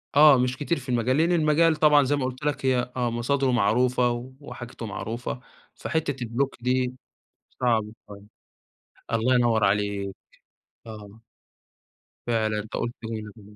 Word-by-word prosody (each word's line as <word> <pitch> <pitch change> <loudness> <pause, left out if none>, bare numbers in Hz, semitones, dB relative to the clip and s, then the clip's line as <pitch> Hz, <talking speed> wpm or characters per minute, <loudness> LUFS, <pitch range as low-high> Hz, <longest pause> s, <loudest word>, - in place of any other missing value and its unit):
آه، 145 -2 +8
مش 125 +1 0
كتير 150 +2 -1
في 130 0 -11
المجال، 125 +3 +1
لأن 165 +2 +3
المجال 160 0 +3
طبعًا 150 -2 +5
زي 145 +2 +1
ما 135 - -1
قُلت 130 +3 -6
لك 145 -2 -1
هي 125 -1 +1
آه، 120 -1 0
مصادرُه 130 +3 0
معروفة، 120 +2 +1
وحاجتُه 120 -4 -9
معروفة، 115 +4 -5 0.4
فحتّة 145 -6 -2
الblock 120 +4 -1
دي 125 0 0 0.7
صعب 115 -4 +2 0.2
شوية، 100 -1 -11 0.9
الله 115 +3 +2
ينوّر 115 -3 +3
عليك، 100 -1 0 0.7
آه. 105 0 -11 1.1
فعلًا 110 -2 0
أنت 110 - -15
قُلت 120 - -2
جملة 110 -2 -8
125 Hz, 135 wpm, -25 LUFS, 110-135 Hz, 1.1 s, آه